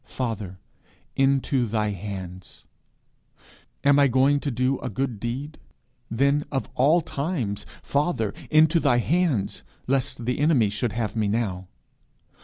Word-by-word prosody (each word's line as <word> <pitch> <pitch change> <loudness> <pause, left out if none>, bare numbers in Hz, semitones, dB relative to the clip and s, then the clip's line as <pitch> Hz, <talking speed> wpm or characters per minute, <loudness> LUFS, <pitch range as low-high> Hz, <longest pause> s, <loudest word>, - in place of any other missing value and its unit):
Father, 110 -7 -4 0.6
into 135 -2 +2
thy 105 -1 0
hands. 95 -2 -8 1.2
Am 140 0 +5
I 140 - +6
going 135 +3 +3
to 145 - -2
do 130 +2 0
a - - -4
good 120 0 -3
deed? 135 +7 -5 0.5
Then, 140 +5 +2
of 135 -5 -2
all 150 +7 +4
times, 140 - -3 0.2
Father, 140 - 0 0.2
into 160 +2 +5
thy 140 -6 +3
hands; 145 - 0 0.2
lest 130 -3 -1
the 125 +2 -1
enemy 140 -9 +3
should 105 +1 -2
have 115 -1 -2
me 110 -2 +1
now. 100 -4 -2
125 Hz, 130 wpm, -25 LUFS, 105-140 Hz, 1.2 s, I